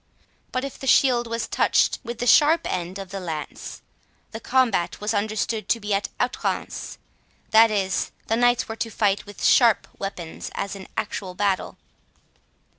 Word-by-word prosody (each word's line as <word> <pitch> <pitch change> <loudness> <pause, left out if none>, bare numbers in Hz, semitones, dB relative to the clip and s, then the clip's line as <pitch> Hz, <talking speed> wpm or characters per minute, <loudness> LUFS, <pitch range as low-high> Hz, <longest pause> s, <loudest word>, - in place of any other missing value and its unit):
But 255 +1 -1
if 275 - -8
the 270 - -6
shield 245 -3 +4
was 230 0 -3
touched - - +2
with 235 -1 -6
the 245 - -3
sharp 305 +7 +6
end 180 +1 -3
of 195 -2 -8
the 195 - -4
lance, 160 -5 -6 0.5
the 225 - -6
combat 240 -9 +1
was 210 +2 -1
understood 215 +1 -1
to 230 - +2
be 210 -1 -2
at 200 +1 0
"outrance", - - -2 0.5
that 225 +1 +7
is, 195 -3 0 0.2
the 225 - +1
knights 245 0 +2
were 225 - -6
to 230 - -2
fight 205 -2 0
with 205 - -10
sharp 235 -4 +5
weapons, 180 -4 -6
as 200 0 -3
in 190 -1 -10
actual 190 -3 -4
battle. 195 -1 -1
215 Hz, 165 wpm, -24 LUFS, 195-235 Hz, 0.5 s, that